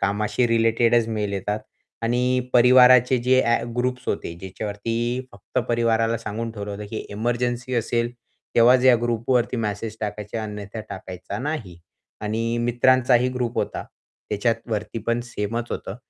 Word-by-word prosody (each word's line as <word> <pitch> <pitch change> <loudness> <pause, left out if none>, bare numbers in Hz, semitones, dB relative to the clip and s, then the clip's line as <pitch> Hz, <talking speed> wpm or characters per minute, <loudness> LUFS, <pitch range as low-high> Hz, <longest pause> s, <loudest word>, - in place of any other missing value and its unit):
कामशी 105 +4 +1
रिलेटेडच 115 0 +3
mail 105 -2 -2
येतात 105 +2 -2 0.4
आणि 125 +2 +1
परिवाराचे 125 +1 +6
जे 130 +1 +4
ॲ 115 0 +1
ग्रुप्स 125 0 -1
होते 90 - -2
ज्याच्यावरती 110 +5 -3
फक्त 100 +5 -5
परिवाराला 115 -1 +2
सांगून 115 +1 -4
ठेवलं 105 -1 -6
होतं, 105 +1 -6
की 110 - -4
"एमर्जन्सी 120 +3 -2
असेल 120 +1 0 0.4
तेव्हाच 125 +2 +6
या 130 -2 +8
ग्रुपवरती 120 +1 +1
मेसेज 110 0 -3
टाकायचे 105 0 -4
अन्यथा 105 0 -6
टाकायचा 95 +2 -7
नाही." 120 - -4 0.4
आणि 115 +2 -1
मित्रांचा 125 +2 +3
ही 125 +1 +4
ग्रुप 125 -2 -2
होता. - - -2 0.5
त्याच्यावरती 110 0 -1
पण 115 +1 +1
सेमच 115 0 -4
होतं - - -5
115 Hz, 135 wpm, -23 LUFS, 105-120 Hz, 0.5 s, या